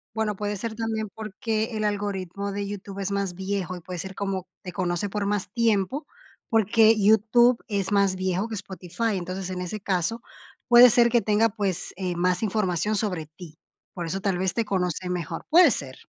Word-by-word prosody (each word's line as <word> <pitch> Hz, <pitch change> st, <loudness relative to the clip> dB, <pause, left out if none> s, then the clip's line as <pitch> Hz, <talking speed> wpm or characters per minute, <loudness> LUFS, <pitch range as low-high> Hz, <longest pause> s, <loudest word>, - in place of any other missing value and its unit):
Bueno, 215 Hz, -2 st, -1 dB
puede 205 Hz, +1 st, -3 dB
ser 225 Hz, +2 st, -4 dB
también 220 Hz, -1 st, -2 dB
porque 220 Hz, +1 st, -3 dB
el 215 Hz, 0 st, -2 dB
algoritmo 200 Hz, -1 st, -2 dB
de 200 Hz, 0 st, -3 dB
YouTube 200 Hz, -1 st, -7 dB
es 195 Hz, 0 st, -2 dB
más 200 Hz, -2 st, -1 dB
viejo, 190 Hz, -1 st, -3 dB
y -, -, -9 dB
puede 180 Hz, +1 st, -7 dB
ser 190 Hz, +2 st, -6 dB
como 195 Hz, -2 st, -3 dB
te 180 Hz, -, -7 dB
conoce 175 Hz, +1 st, -2 dB
por 205 Hz, 0 st, -2 dB
más 200 Hz, -2 st, -1 dB
tiempo, 230 Hz, -, +1 dB, 0.4 s
porque 225 Hz, 0 st, +5 dB
YouTube 230 Hz, +4 st, +5 dB
es 200 Hz, -2 st, -2 dB
más 200 Hz, -2 st, +3 dB
viejo 185 Hz, +2 st, -1 dB
que 225 Hz, -, -6 dB
Spotify. 195 Hz, +2 st, -3 dB
Entonces, 185 Hz, +1 st, -4 dB
en 180 Hz, -1 st, -4 dB
ese 200 Hz, +4 st, -5 dB
caso, 195 Hz, +4 st, -1 dB, 0.5 s
puede 240 Hz, 0 st, +9 dB
ser 235 Hz, +1 st, +5 dB
que 235 Hz, -1 st, +2 dB
tenga, 215 Hz, +2 st, +3 dB
pues, 200 Hz, -4 st, -3 dB
eh, 185 Hz, -2 st, -2 dB
más 180 Hz, +3 st, 0 dB
información 210 Hz, -1 st, 0 dB
sobre 190 Hz, -7 st, -1 dB
ti. 155 Hz, +1 st, -13 dB, 0.4 s
Por 175 Hz, -, -4 dB
eso 195 Hz, +4 st, -3 dB
tal 195 Hz, -2 st, 0 dB
vez 185 Hz, 0 st, 0 dB
te 230 Hz, -2 st, -1 dB
conoce 180 Hz, -1 st, -1 dB
mejor, 180 Hz, -4 st, -4 dB
puede 335 Hz, -3 st, +7 dB
ser. 135 Hz, -, -4 dB
200 Hz, 190 wpm, -25 LUFS, 185-220 Hz, 0.5 s, puede